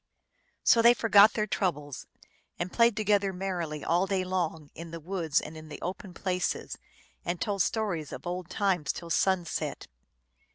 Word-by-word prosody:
So 230 - +6
they 235 +1 +7
forgot 215 -2 +6
their 215 - 0
troubles, 150 - -2 0.5
and 175 +1 -4
played 230 -2 +4
together 205 -2 +2
mer 190 -1 -3
rily 150 -3 -4
all 175 +3 +2
day 190 -1 0
long 165 -5 -2
in 170 0 -8
the 165 0 -7
woods 165 -2 0
and 160 - -8
in 155 0 -10
the 150 - -8
open 180 0 -6
places, 180 -1 -2 0.5
and 175 0 -2
told 200 -2 -1
stories 180 -8 -1
of - - -8
old 180 0 -4
times 185 -8 0
till 170 -1 -8
sunset. 185 -1 0
180 Hz, 165 wpm, -29 LUFS, 165-200 Hz, 0.5 s, they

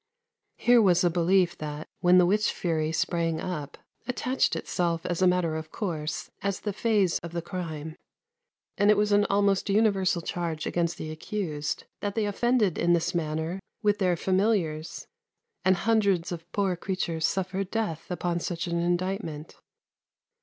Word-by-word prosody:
Here 240 -1 +5
was 180 -3 +4
a 175 - +3
belief 175 +1 +3
that, 150 0 -5
when 180 +1 +5
the 180 - +6
witch 210 +4 +2
fury 160 -3 -1
sprang 165 -1 0
up, 150 -6 -5 0.3
attached 255 +1 0
itself 170 -2 -1
as 175 0 -2
a 185 - +6
matter 180 -3 +2
of 160 0 -6
course 160 -7 -4
as 200 -1 -1
the 205 - -3
phase 205 -5 +2
of 170 0 -8
the 170 - -2
crime; 160 -4 -5 0.8
and 205 +1 +4
it 210 - +6
was 210 0 +2
an 205 0 +4
almost 200 0 +2
universal 195 -4 +2
charge 165 -3 -3
against 170 -1 -1
the 155 - -5
accused 155 -3 -3 0.2
that 205 -1 -3
they 220 -2 +1
offended 210 -2 +1
in 175 0 +3
this 170 -1 +1
manner 160 +2 -2 0.2
with 205 -1 +2
their 180 -3 +2
familiars, 185 -5 0 0.6
and 185 0 +4
hundreds 200 -4 +1
of 170 0 -7
poor 195 -3 0
creatures 170 -3 -1
suffered 190 0 -2
death 205 -9 -3
upon 175 -1 -1
such 170 +1 -3
an 170 -1 -1
indictment. 175 -2 -2
180 Hz, 160 wpm, -27 LUFS, 165-200 Hz, 0.8 s, the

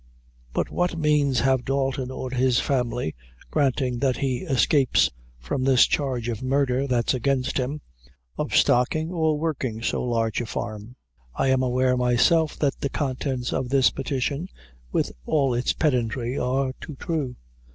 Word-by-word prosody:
"But - - -1
what 175 -1 0
means 150 -5 +2
have 130 -1 +2
Dalton 135 -1 -1
or 130 -1 -5
his 130 -1 +2
family, 125 - -1 0.4
granting 130 -4 +1
that 130 -1 +1
he 130 -3 0
escapes 140 -3 +2 0.3
from - - -3
this 130 -2 +6
charge 130 -5 -1
of 115 -3 -3
murder 135 0 +1
that's 120 -3 +1
against 130 +1 0
him, 140 +4 -3 0.5
of - - -2
stocking 155 +7 +3
or 160 -3 +1
working 130 -8 -3
so - - 0
large 115 -2 0
a 120 - -5
farm? 110 +2 -5 0.4
I 135 - +1
am 130 0 +3
aware 125 0 +2
myself 125 +6 +3
that 145 -2 0
the 140 - -1
contents 130 -2 -2
of 130 -2 -2
this 135 -1 +4
petition, 140 +5 -2 0.4
with - - 0 0.2
all 140 -4 +2
its 120 +1 +1
pedantry, 125 -3 0
are 130 0 0
too 150 - -7
true." 145 -3 -3
130 Hz, 150 wpm, -24 LUFS, 125-140 Hz, 0.5 s, this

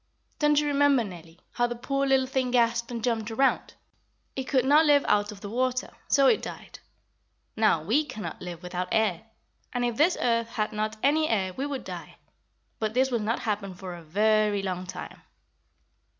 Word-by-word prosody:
Don't 295 -1 +4
you 300 - 0
remember, 285 -3 +3
Nellie, 170 -4 -11
how 240 0 +1
the 240 - -4
poor 275 +3 -1
little 265 -1 +3
thing 260 -1 -1
gasped 235 -1 +2
and 235 -2 -5
jumped 230 -3 -1
around? 265 +4 +1 0.6
It 265 - -3
could 260 -1 +1
not 300 +3 +5
live 285 -1 +5
out 205 0 +2
of 200 -2 -12
the 205 - -6
water, 255 +2 -1 0.2
so 275 -1 +4
it 420 - +4
died. - - -9 0.8
Now, 215 -8 +2
we 235 - +2
cannot 220 -8 -7
live 175 -1 -7
without 180 0 -3
air, 215 -3 +1 0.5
and 245 0 -1
if 240 -2 -2
this 335 +5 +3
earth 230 -1 +1
had 215 -2 -2
not 215 +1 -2
any 310 +3 +3
air 190 -4 0
we 275 +7 -3
would 275 -2 -4
die. - - -8 0.6
But 220 0 -2
this 260 +1 +2
will 240 - +1
not 220 +3 -1
happen 205 -4 -3
for 180 0 -7
a 175 - -9
very 210 +4 +2
long 185 -1 -3
time." - - -8
230 Hz, 190 wpm, -27 LUFS, 205-265 Hz, 0.8 s, not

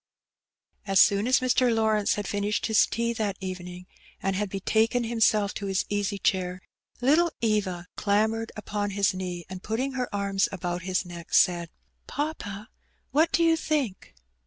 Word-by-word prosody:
As 195 -1 +3
soon 205 +2 +5
as 260 +1 +4
Mr. 255 -1 +3
Lawrence 220 -2 +2
had 205 -2 -4
finished 205 +1 -1
his 220 -4 +4
tea 235 +1 -1
that 210 -4 -2
evening, 180 -1 -7 0.3
and 195 0 -1
had 205 +1 -1
betaken 220 +5 +1
himself 220 -3 +2
to 200 - -5
his 190 -1 0
easy 205 0 -1
chair, 185 -2 0 0.4
little 315 +7 +4
Eva 205 -6 0
clam 210 +2 +2
bered 225 0 -4
upon 210 -1 -3
his 200 -1 +3
knee, 180 -2 -5
and, 185 -1 -8
putting 240 +7 -2
her 255 -2 -3
arms 200 -1 0
about 175 -2 -3
his 185 0 -1
neck, 170 -2 -5
said— 175 -2 +3 0.4
''Papa, 235 -8 -4 0.4
what 320 +3 +3
do 340 - +3
you 330 0 +5
think?" 275 - -2
205 Hz, 160 wpm, -27 LUFS, 190-230 Hz, 0.4 s, soon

